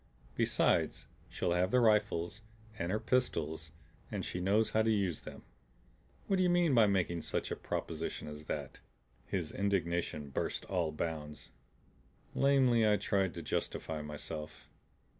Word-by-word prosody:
"Besides, - - +2 0.2
she'll - - -1
have 90 +1 +2
the 125 - +4
rifles 105 -4 +2 0.4
and 85 +2 -1
her 105 - +1
pistols, 80 -12 0 0.4
and - - -3
she 90 - -3
knows 105 +4 +2
how 110 - +3
to 110 - +2
use 100 -7 +1
them. - - -10 0.8
What 195 - +1
d'ye 185 -1 +3
mean 175 -4 +3
by 115 -4 +6
making 90 -4 +1
such - - -2
a - - 0
proposition - - -4
as 75 0 -8
that?" 70 -4 -4 0.5
His 85 -5 -2
indignation 85 -7 -1
burst - - -2
all 90 -5 0
bounds. 75 -1 -5 0.8
Lamely 130 -5 +4
I 105 - +4
tried 95 -2 0
to 85 - -5
justify 80 0 -2
myself. 75 +1 -7
90 Hz, 140 wpm, -33 LUFS, 80-110 Hz, 0.8 s, by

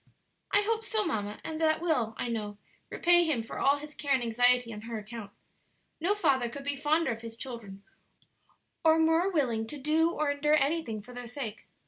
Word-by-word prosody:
"I 410 +1 +4
hope 450 +1 0
so, 440 -2 0
mamma; 210 - -3
and 320 0 -5
that 315 -1 +3
will, 255 -10 0
I - - -2
know, 210 -3 -4 0.3
repay 345 0 +4
him 295 -9 0
for 225 - -7
all 280 +1 +4
his 300 +1 -9
care 285 -2 +1
and 250 - -1
anxiety 245 +1 +3
on 210 - -8
her 230 0 -5
account. 215 0 -8 0.7
No 365 +6 +1
father 260 - +2
could 275 +4 -8
be 285 0 0
fonder 305 +3 +1
of 225 -1 -5
his 230 0 -9
children 220 -6 -8 1.0
or 320 0 +5
more 325 +3 +3
willing 235 -9 0
to 295 - -5
do 310 +4 +2
or 305 -3 0
endure 295 +1 +2
anything 275 -8 0
for 250 - -12
their 245 0 -7
sake. 235 -3 -6
275 Hz, 195 wpm, -29 LUFS, 230-320 Hz, 1.0 s, or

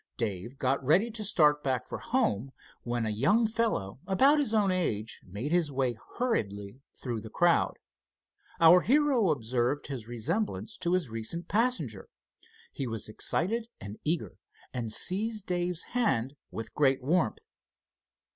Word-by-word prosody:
Dave 115 +3 -3
got 135 +1 0
ready 185 - +3
to 220 -1 -5
start 150 -7 +3
back 130 -4 -1
for - - -6
home, 135 - 0 0.3
when 120 -1 -2
a 110 - -1
young 160 - +3
fellow 220 - -1
about 270 +10 +4
his 280 -7 +1
own 210 -4 +3
age 115 - -2
made 105 - -4
his 170 -4 +2
way 130 -3 0 0.2
hurriedly 105 - -2
through 120 -4 -4
the 110 - -9
crowd. 175 +8 +2 0.8
Our 170 +2 +8
hero 265 - +3
observed 125 0 0
his 125 -6 -6
resemblance 120 - -2
to 175 - -1
his 175 -10 0
recent 115 +10 -3
passenger. 200 - 0 0.6
He 135 - -4
was 115 -2 -3
excited 220 - 0
and 105 +2 -8
eager, 165 +2 -2 0.3
and 115 -3 -3
seized 210 - +1
Dave's 175 -1 -1
hand 140 - +1 0.2
with 115 - -7
great 135 -3 +2
warmth. 180 - 0
150 Hz, 145 wpm, -29 LUFS, -, 0.8 s, Our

